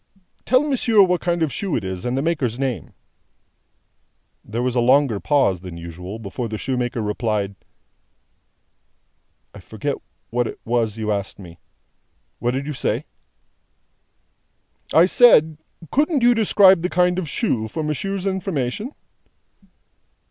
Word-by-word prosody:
"Tell 255 +3 +4
monsieur 235 -7 +3
what 180 -1 +1
kind 175 -1 0
of 150 - -1
shoe 195 -6 -2
it - - -2
is, 95 +3 -5
and 125 +1 -1
the 135 - 0
maker's 145 -8 -1
name." 130 -3 -3 1.5
There 115 +3 -3
was 125 -1 0
a 125 - +1
longer 130 -2 +3
pause 135 - +2
than 90 -2 -9
usual, 90 +4 -8
before 115 +2 -5
the 110 - -4
shoemaker 120 -2 -2
replied: 105 -1 -1 2.0
"I - - -11
forget - - -4 0.4
what 120 0 0
it - - -8
was 115 -2 0
you 110 -1 -2
asked 100 -1 -3
me. 85 -3 -12 0.8
What 120 +1 -1
did 135 +1 -3
you 150 - -4
say?" 130 - -2 1.9
"I 165 - +6
said, 160 -8 +5 0.3
couldn't 295 -1 +1
you 240 0 +6
describe 200 -5 +5
the 180 - -1
kind 180 0 +2
of 165 -5 -4
shoe, 125 - -1
for 155 +8 -4
monsieur's 190 +6 -3
information?" 190 - -2
135 Hz, 140 wpm, -21 LUFS, 110-180 Hz, 2.0 s, I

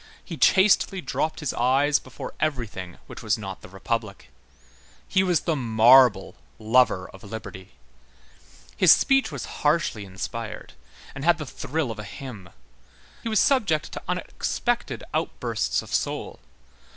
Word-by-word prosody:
He - - -6
chastely 195 0 +4
dropped 160 -2 -2
his 150 - -2
eyes 135 +4 +2
before 130 - -9
everything 115 - -3
which - - -10
was 110 0 0
not 95 -3 -7
the - - -12
Republic. 100 +1 -4 0.8
He 190 - +2
was 180 -4 +2
the 165 - 0
marble 120 -3 +5 0.2
lover 110 -4 +2
of 95 - -15
liberty. 100 -3 -9 1.0
His - - +6
speech 270 -6 +4
was 140 -4 -5 0.2
harshly 150 -8 +1
inspired, 105 -2 -7 0.4
and 135 - -7
had 170 +1 +4
the 150 - -6
thrill 145 0 -3
of 110 - -8
a - - -5
hymn. 105 -4 -9 0.7
He 230 - -4
was 215 -2 +2
subject 200 - +2
to - - -6
unexpected 205 +6 -2
outbursts - - -1
of - - -10
soul. - - -2
125 Hz, 140 wpm, -25 LUFS, 105-160 Hz, 1.0 s, His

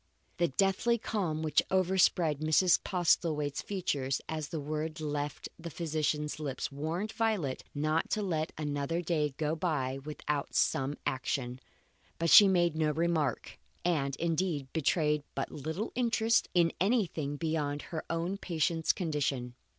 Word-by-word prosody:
The 175 -1 +3
deathly 195 - +2
calm 175 -9 -2
which 155 - +3
overspread 185 -5 +3
Mrs. 155 +4 +4
Postlethwaite's 160 -5 +1
features 140 -9 -1
as 155 -2 -3
this 160 - -3
word 155 +2 -3
left 145 -1 -3
the 170 +1 -6
physician's 150 -2 -2
lips 140 -3 -3
warned 160 +9 -3
Violet 220 -12 -1
not 155 +2 0
to 215 - 0
let 160 -4 -1
another 150 +3 -2
day 150 -5 0
go 155 0 0
by 145 -6 -1
without 150 -1 -3
some 135 +2 +1
action. 130 -2 -2 0.6
But 165 0 +1
she 205 - +10
made 175 -4 +3
no 155 -1 +2
remark, 160 -4 -1 0.3
and, 140 -6 +1
indeed, 165 -4 -1
betrayed 150 -1 +2
but - - -2
little 160 +9 -4
interest 230 -2 +2
in 170 -1 +4
anything 180 - +1
beyond 150 -2 -2
her 160 - -2
own 170 +4 -2
patient's 165 -2 +1
condition. 140 -8 -2
155 Hz, 135 wpm, -31 LUFS, 145-175 Hz, 0.6 s, she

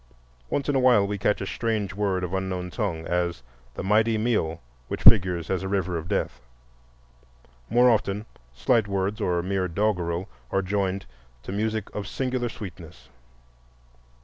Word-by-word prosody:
Once 140 - -1
in 145 - +2
a 135 - +3
while 125 -6 +5
we 100 0 -3
catch 105 - +1
a - - -2
strange 105 -2 -1
word 100 -2 0
of 90 0 -3
an 95 0 0
unknown 90 -1 -4
tongue, 85 -8 -2
as 85 -5 -1 0.3
the - - -4
"Mighty 110 +3 +3
Myo," 105 -8 0 0.3
which - - -5
figures 90 -6 +6
as 95 -1 0
a 95 - -3
river 95 -3 0
of 80 0 -4
death; - - -2 1.3
more 120 +3 +5
often 105 -3 +1 0.3
slight 110 - +2
words 100 +2 -1
or 90 -3 +1
mere 95 0 0
doggerel 90 -2 0 0.2
are 95 - +1
joined 95 0 -1 0.4
to - - -6
music 110 +1 -2
of 100 -2 -4
singular 125 +2 -1
sweetness. 85 - -10
100 Hz, 160 wpm, -26 LUFS, 90-110 Hz, 1.3 s, figures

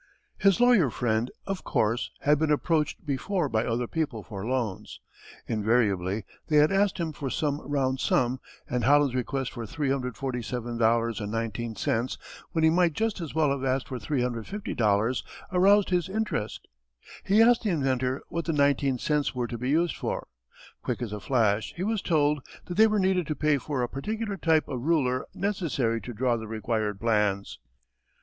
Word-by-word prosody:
His 195 +1 +4
lawyer 240 - +5
friend, 115 0 0 0.2
of 195 -1 -4
course, 115 +4 0
had 145 0 +3
been 160 -1 +1
approached 150 0 0
before 150 +5 -1
by 110 -3 0
other 120 +1 0
people 130 -6 -3
for 95 +2 -7
loans. 115 -5 -3 0.5
Invariably 105 -3 +1 0.2
they 150 - +3
had 150 +3 +5
asked 195 0 +2
him 165 -3 -2
for 145 -2 -4
some 145 +1 -1
round 135 -2 -1
sum 125 +1 +1 0.3
and 125 -1 -1
Holland's 145 +1 +4
request 130 +1 -2
for 120 - -6
$347.19 115 -3 -1 0.3
when 160 -2 0
he 160 - +6
might 175 -1 +3
just 220 +2 -1
as 160 -3 -6
well 155 -3 +3
have 140 -1 -2
asked 130 0 0
for 130 -2 -4
$350.00 120 - 0 0.3
aroused 195 +2 +4
his 180 0 +1
interest. 195 - -3 0.6
He 200 +3 +3
asked 235 +1 +6
the 220 - -1
inventor 130 -5 0
what 170 -1 -3
the 165 - 0
nineteen 140 -2 +2
cents 150 +2 0
were 125 -1 -1
to 120 0 -5
be 125 +2 -2
used 165 +3 +2
for. - - -3 0.5
Quick - - -3
as 110 -3 -5
a 105 - -4
flash 110 -3 +1
he 175 - -3
was 215 0 0
told 150 -3 +2 0.2
that 175 - -5
they 220 +3 +7
were 215 -1 +1
needed 185 -3 +1
to 155 - -2
pay 150 -2 +2
for 135 -2 -2
a - - 0
particular 210 - -3
type 160 -4 +2
of 130 -3 -4
ruler 135 -4 +1
necessary 155 - -1
to 125 - -7
draw 120 +1 0
the 110 -1 -7
required 110 -2 -2
plans. 105 -3 0
135 Hz, 170 wpm, -27 LUFS, 115-165 Hz, 0.6 s, they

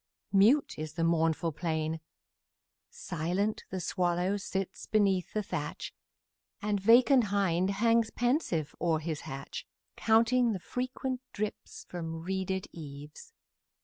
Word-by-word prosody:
Mute 220 - +4
is 155 0 -5
the 165 0 -1
mournful 165 0 +2
plain; 160 0 -2 0.9
Silent 180 +6 -2
the 190 - -3
swallow 180 +2 0
sits 195 -1 -4
beneath 195 -4 +2
the 215 - 0
thatch, - - -4 0.7
And 205 -1 0
vacant 240 +4 +6
hind 190 -3 +1
hangs 230 +2 +3
pensive 240 - 0
o'er 165 -2 +2
his 155 -1 -4
hatch, 135 +1 -6 0.3
Counting 230 +1 +3
the 190 - -3
frequent 255 +4 -3
drips 210 0 -5
from 165 -2 -5
reeded 190 0 -2
eaves. 150 - -10
190 Hz, 115 wpm, -30 LUFS, 165-220 Hz, 0.9 s, vacant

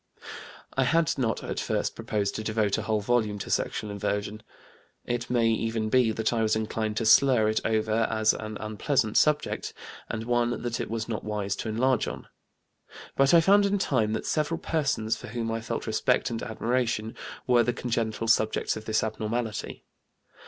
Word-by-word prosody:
I 135 - +3
had 165 +3 +2
not 115 -4 -1
at - - -3
first - - -1
proposed 100 -2 -2
to 110 - -4
devote 110 -2 0
a - - -2
whole 110 -1 0
volume 110 -2 +1
to - - -6
sexual 105 - -1
inversion. 105 +1 -3 0.6
It 120 0 -3
may 120 -2 +2
even 115 -1 -1
be 125 -1 +4
that 110 +1 -1
I 115 - +1
was 110 -1 +2
inclined 110 0 -2
to 115 - 0
slur 120 -1 +5
it 110 - +1
over 110 0 +1
as 110 -1 +3
an 110 -1 -6
unpleasant 110 +2 -1
subject, 150 -1 +1 0.3
and 110 -1 -3
one 120 0 0
that 120 -1 -2
it - - -3
was 115 0 -3
not 110 -2 -4
wise 105 -2 -2
to 110 - -4
enlarge 125 +2 +1
on. - - -6 0.9
But 135 +4 +5
I 165 - +7
found 200 +3 +5
in 200 +1 +1
time 125 - +1
that - - -3
several 155 +1 0
persons 130 -10 -1
for - - -10
whom 115 0 -3
I 115 0 -2
felt - - -4
respect - - +1
and 115 - -3
admiration 115 -1 -1 0.3
were 125 -1 +4
the 120 +1 +1
congenital 115 -2 -2
subjects 110 -1 +2
of 110 0 -8
this 110 0 +1
abnormality. 110 +1 -3
115 Hz, 180 wpm, -27 LUFS, 110-120 Hz, 0.9 s, I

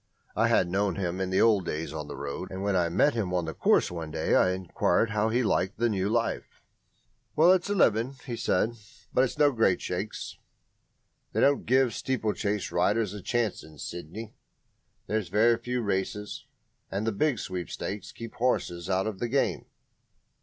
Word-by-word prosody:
I - - +3
had 90 - +3
known 95 0 0
him 90 -1 -2
in 95 - -1
the 95 - +2
old 110 -4 +4
days 80 +1 -3
on 75 -2 -5
the - - -7
road, 70 +6 -5
and 95 +1 -5
when 100 -1 +1
I 85 -2 +2
met 100 - +3
him 95 -6 -1
on 90 -2 0
the 80 - -4
course - - +3
one 85 -2 -5
day 80 0 -1
I 90 - +5
enquired 95 +4 +1
how 105 +1 +1
he 120 +3 +1
liked 100 -2 0
the 120 +1 +2
new 100 -2 0
life. - - -2 0.7
"Well, 165 +4 +6
it's 185 +1 +2
a 205 - +1
livin'," 115 - +3
he 120 -4 -4
said, 110 0 +1 0.4
"but 130 - +4
it's 130 - -2
no 145 -1 +5
great 110 -7 +2
shakes. 95 +4 -5 0.9
They - - +1
don't 140 0 +3
give 130 -1 +3
steeplechase 105 -5 -1
riders 110 -4 +1
a 105 - -7
chance 120 -1 -1
in 80 -1 -14
Sydney. 90 +9 -7 0.7
There's 105 -4 -2
very 110 +5 +4
few 125 +1 -3
races, 100 +1 -3 0.4
and 100 +3 -2
the 115 - +1
big 135 +5 +1
sweepstakes 95 +1 -5
keep 115 -1 -9
horses 100 -8 -1
out 95 0 +1
of 105 -3 -4
the 120 - -2
game." 135 +3 0
105 Hz, 185 wpm, -28 LUFS, 90-115 Hz, 0.9 s, Well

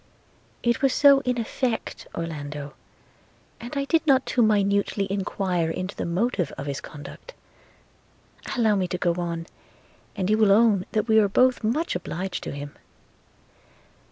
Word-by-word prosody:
'It 235 0 +1
was 270 -2 +3
so 280 -1 +7
in 250 -1 0
effect, 230 +1 -3
Orlando, 145 -3 -5 0.9
and 245 +5 -7
I 280 - 0
did 325 +2 +1
not 265 -2 +4
too 245 - +1
minutely 200 -2 +2
enquire 185 -3 -1
into 185 +4 -4
the - - -3
motive 180 - 0
of 140 - -5
his 140 -1 -4
conduct. 150 - -11 1.2
Allow 220 -3 +3
me 185 -1 0
to 180 - -3
go 175 -1 +1
on, 170 -1 -4 0.7
and 190 -3 -1
you 215 +2 +2
will 215 -2 +5
own 205 -3 +4
that 215 +1 0
we 220 -1 +5
are 205 -2 +3
both 255 +5 +3
much 260 - 0
obliged 180 +1 -4
to - - -4
him. 145 0 -7
200 Hz, 155 wpm, -25 LUFS, 175-235 Hz, 1.2 s, so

